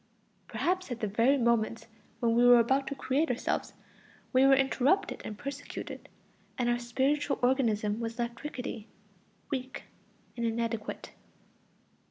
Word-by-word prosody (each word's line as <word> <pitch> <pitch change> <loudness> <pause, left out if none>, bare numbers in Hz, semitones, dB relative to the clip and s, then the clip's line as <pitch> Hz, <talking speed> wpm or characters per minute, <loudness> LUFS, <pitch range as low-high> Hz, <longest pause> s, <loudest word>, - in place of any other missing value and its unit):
Perhaps 370 -1 -1
at 245 -2 -4
the 220 - -1
very 230 +7 +3
moments 235 -2 +1 0.4
when 230 -1 +2
we 240 +1 +4
were 245 0 +8
about 265 +4 +2
to 275 - -3
create 275 +4 0
ourselves, 245 - -2 0.6
we 260 +1 +6
were 270 - +7
interrupted 270 +7 +1
and 210 - -6
persecuted, 280 +2 -7 0.5
and 245 -3 0
our 240 0 +1
spiritual 270 +5 0
organism 225 -5 +1
was 230 0 -4
left 235 -1 -4
rickety, 250 -6 -5 0.6
weak, 260 -1 -4 0.5
and 235 - -4
inadequate. 230 -1 -3
245 Hz, 135 wpm, -30 LUFS, 230-270 Hz, 0.6 s, were